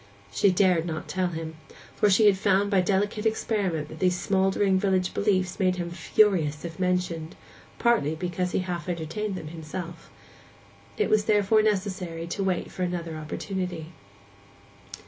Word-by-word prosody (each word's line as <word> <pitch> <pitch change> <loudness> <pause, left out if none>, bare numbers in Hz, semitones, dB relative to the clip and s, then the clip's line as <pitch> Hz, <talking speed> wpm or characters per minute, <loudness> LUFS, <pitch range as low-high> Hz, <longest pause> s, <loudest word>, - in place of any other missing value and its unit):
She 100 - +3
dared 180 -3 +3
not 160 -2 -4
tell 185 0 0
him, 160 -2 -6 0.4
for 210 - +3
she 200 +3 +5
had 205 -2 +6
found 200 +1 +2
by 195 -2 +4
delicate 205 +3 0
experiment 200 -8 -1
that 155 - -10
these 180 -1 +2
smouldering 190 0 +2
village 185 -2 +1
beliefs 185 -2 0
made 185 -2 +2
him 175 -1 -4
furious 170 -5 +2
if 165 0 -7
mentioned, 180 -3 -1 0.4
partly 225 -11 +2
because 180 +1 -2
he - - 0
half 175 -1 -4
entertained 175 +5 -3
them 155 -4 -6
himself. 165 +1 -7 0.9
It 430 - 0
was 215 -1 +3
therefore 210 0 +4
necessary 185 -5 -1
to 185 +4 -3
wait 185 -2 -1
for - - -7
another 175 -2 -2
opportunity. 170 +1 -4
185 Hz, 150 wpm, -26 LUFS, 170-200 Hz, 0.9 s, had